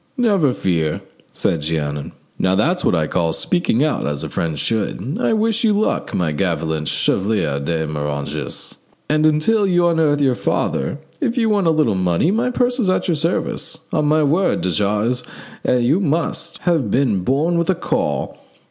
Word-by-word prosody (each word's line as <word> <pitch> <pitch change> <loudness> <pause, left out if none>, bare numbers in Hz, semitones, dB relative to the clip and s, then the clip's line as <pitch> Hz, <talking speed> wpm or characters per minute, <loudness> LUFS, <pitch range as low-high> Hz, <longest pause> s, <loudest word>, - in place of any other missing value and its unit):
"Never 200 - +3
fear," 80 -9 -1 0.3
said 80 - -1
Jeannin. 75 -2 -3 0.3
"Now, 95 0 +2
that's 170 - +1
what - - +2
I 80 -2 +1
call 85 0 0
speaking 175 -8 +1
out 155 - 0
as 75 +1 -3
a 80 - -4
friend 80 -1 -2
should. 110 - -2
I - - +2
wish 225 +2 +1
you 220 -2 +4
luck, 210 +1 0
my 85 -4 0
gallant 80 -2 -1
Chevalier 95 -8 0
de 80 +3 -1
Moranges, 75 0 -4 0.3
and 155 +1 +3
until 200 +8 +2
you 175 -2 +3
unearth 160 -3 +2
your 135 -3 +3
father, 120 - -1 0.2
if 255 -3 -1
you 225 -2 +2
want 200 -4 +2
a - - +5
little 155 -7 +2
money, 90 - +1
my 235 +4 +1
purse 245 0 0
is 205 -6 +1
at 185 - +1
your 175 - +2
service. 165 0 -2 0.2
On 150 - +1
my 155 +1 +3
word, 165 +7 +2
de 90 - -1
Jars, 105 +8 0 0.5
you 125 +7 +3
must 165 0 -1
have 165 - +1
been 120 -5 +2
born 150 - +1
with 170 - -1
a 190 - +3
caul. 170 - -2
140 Hz, 175 wpm, -19 LUFS, -, 0.5 s, a